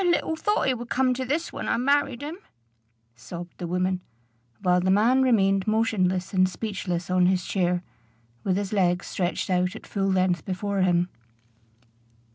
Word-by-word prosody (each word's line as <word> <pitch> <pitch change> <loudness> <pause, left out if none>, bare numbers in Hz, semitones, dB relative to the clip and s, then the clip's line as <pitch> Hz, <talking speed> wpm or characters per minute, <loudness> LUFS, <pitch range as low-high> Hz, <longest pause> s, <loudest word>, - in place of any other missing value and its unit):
"I - - 0
little 345 -2 +1
thought 415 -1 0
it 255 -3 +1
would 240 0 -7
come 255 0 +2
to 260 +1 -3
this 310 +6 -2
when - - -4
I - - +2
married 280 0 +1
him," 315 +5 -6 0.8
sobbed 170 +9 -9
the 175 - -4
woman, 180 +1 0 0.6
while 180 0 +3
the 185 - 0
man 225 +7 +4
remained 195 -6 +3
motionless 195 -5 +1
and 185 -1 +4
speechless 185 -4 -4
on 180 -1 +4
his 185 -1 +1
chair, 180 -2 0 0.6
with 190 -1 +1
his 200 0 -3
legs 180 -3 +2
stretched 180 +1 -2
out 180 0 +1
at - - -10
full 195 -1 -1
length 185 -3 +1
before 195 +1 -2
him. 175 -1 +2
190 Hz, 170 wpm, -25 LUFS, 180-240 Hz, 0.8 s, man